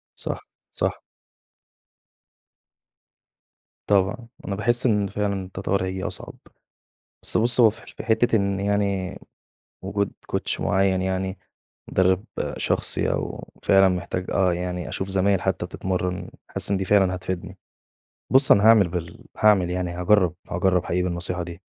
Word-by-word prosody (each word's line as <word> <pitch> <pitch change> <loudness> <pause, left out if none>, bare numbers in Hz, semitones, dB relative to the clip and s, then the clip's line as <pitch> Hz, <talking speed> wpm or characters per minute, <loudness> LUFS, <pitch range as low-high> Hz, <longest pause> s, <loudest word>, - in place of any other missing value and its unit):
صح، - - -4 0.2
صح. - - -2 2.9
طبعًا، 105 +5 +1 0.2
أنا 100 - -2
باحس 120 +4 +3
إن 105 -4 +2
فعلًا 100 -2 -2
التطور 95 0 -2
هييجي 95 0 -4
أصعب، - - -4 0.9
بس - - +2
بُص 120 +2 +5
هو 110 -2 +7
في - - -14
في - - -7
حِتّة 115 0 +2
إن 100 -1 0
يعني 100 -2 -1 0.6
وجود 100 +1 -2 0.2
Coach - - -1
معين 95 -1 +1
يعني، 95 +1 -2 0.5
مدرب 95 +1 +2 0.3
شخصي - - 0
أو - - -4
فعلًا 95 -1 +5
محتاج 90 0 -3
آه 95 -2 +2
يعني 90 -3 -4
أشوف 95 +7 -4
زمايل 95 0 +2
حتى 95 -2 -1
بتتمرن، 90 0 -3 0.2
حاسس - - +2
إن 100 - +2
دي 95 - -3
فعلًا 95 -2 +3
هتفيدني. 95 +1 -6 0.8
بُص 135 +1 +6
أنا 100 - +4
هاعمل 110 -5 +6
بال 85 -1 -6
هاعمل 100 -5 +4
يعني 90 -1 -2
هاجرب، 90 0 +2 0.2
هاجرب 90 0 +1
حقيقي 90 +1 -1
بالنصيحة 90 0 -1
دي، 85 +2 -9
95 Hz, 135 wpm, -23 LUFS, 90-100 Hz, 2.9 s, هو